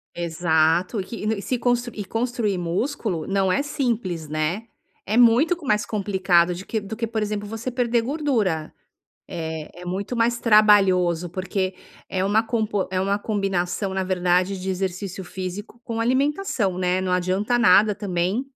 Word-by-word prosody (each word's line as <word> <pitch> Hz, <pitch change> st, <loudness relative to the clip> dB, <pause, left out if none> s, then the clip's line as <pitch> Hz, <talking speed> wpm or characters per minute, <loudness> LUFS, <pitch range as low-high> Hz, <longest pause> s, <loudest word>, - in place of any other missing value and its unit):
Exato, 170 Hz, +3 st, +1 dB
e -, -, -5 dB
que 230 Hz, -, -8 dB
e 215 Hz, -2 st, -1 dB
se 255 Hz, -, -1 dB
constru 245 Hz, -1 st, 0 dB
e 205 Hz, -, -4 dB
construir 225 Hz, -3 st, -1 dB
músculo 180 Hz, -, -2 dB
não 195 Hz, -1 st, +1 dB
é 280 Hz, -, +2 dB
simples, 230 Hz, -, -2 dB
né, 155 Hz, +8 st, -1 dB, 0.4 s
é 215 Hz, -, -1 dB
muito 245 Hz, +9 st, +5 dB
co 330 Hz, -4 st, -12 dB
mais 210 Hz, -2 st, +1 dB
complicado 190 Hz, -4 st, +2 dB
de 185 Hz, -, -8 dB
que 220 Hz, -, -2 dB
do 205 Hz, +2 st, -7 dB
que, 230 Hz, 0 st, -2 dB
por 220 Hz, -1 st, -2 dB
exemplo, 210 Hz, -1 st, -3 dB
você 225 Hz, +3 st, -4 dB
perder 240 Hz, -1 st, +1 dB
gordura. 230 Hz, -, -1 dB, 0.5 s
Eh, 160 Hz, -2 st, -5 dB
é -, -, -9 dB
muito 200 Hz, +7 st, -3 dB
mais 235 Hz, +1 st, +2 dB
trabalhoso, 190 Hz, -6 st, +4 dB
porque 185 Hz, +1 st, -2 dB, 0.3 s
é 190 Hz, 0 st, -1 dB
uma 215 Hz, +3 st, +3 dB
compo 215 Hz, -4 st, -1 dB
é 185 Hz, -, 0 dB
uma 200 Hz, +2 st, +1 dB
combinação, 195 Hz, -2 st, -1 dB
na 190 Hz, 0 st, -1 dB
verdade, 185 Hz, +1 st, +1 dB
de 190 Hz, -, -3 dB
exercício 190 Hz, 0 st, -3 dB
físico 190 Hz, +6 st, -7 dB
com 230 Hz, -1 st, -4 dB
alimentação, 260 Hz, -, 0 dB
né. 180 Hz, 0 st, +1 dB
Não 185 Hz, -1 st, -2 dB
adianta 185 Hz, +6 st, +1 dB
nada 215 Hz, -2 st, +5 dB
também 185 Hz, +3 st, -1 dB
200 Hz, 165 wpm, -23 LUFS, 180-230 Hz, 0.5 s, muito